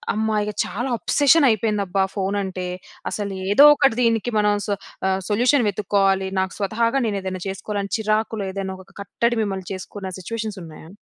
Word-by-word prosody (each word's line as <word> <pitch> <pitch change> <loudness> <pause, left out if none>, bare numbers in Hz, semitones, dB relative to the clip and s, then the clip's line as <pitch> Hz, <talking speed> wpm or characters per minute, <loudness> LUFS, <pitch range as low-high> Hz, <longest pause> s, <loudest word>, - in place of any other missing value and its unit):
అమ్మా! 220 0 0
ఇగ 210 - -4
చాలా 240 +5 -3
అబ్సెషన్ 290 0 +4
అయిపోయిందబ్బా! 200 -3 +1
ఫోనంటే. 190 -2 -2 0.4
అసలు 200 -2 -3 0.2
ఏదో 275 +8 +7
ఒకటి 275 -5 +3
దీనికి 230 0 +1
మనం 210 0 +3
స - - -5 0.4
ఆహ్, 190 0 0
సొల్యూషన్ 245 +4 +3
వెతుక్కోవాలి. 195 -1 +1
నాకు 190 0 -3
స్వతహాగా 230 +6 0
నేనేదైనా 190 -3 -3
చేసుకోవాలి, 200 +2 -4
అని 200 - -7
చిరాకులో 215 0 -1
ఏదైనా 190 -1 -4
ఒక - - -22
కట్టడి 235 +4 -1
మిమ్మల్ని 190 -3 -4
చేసుకున్న 190 +1 -7
సిట్యుయేషన్స్ 215 0 -5
ఉన్నాయా? 160 0 -12
205 Hz, 150 wpm, -22 LUFS, 190-225 Hz, 0.4 s, ఏదో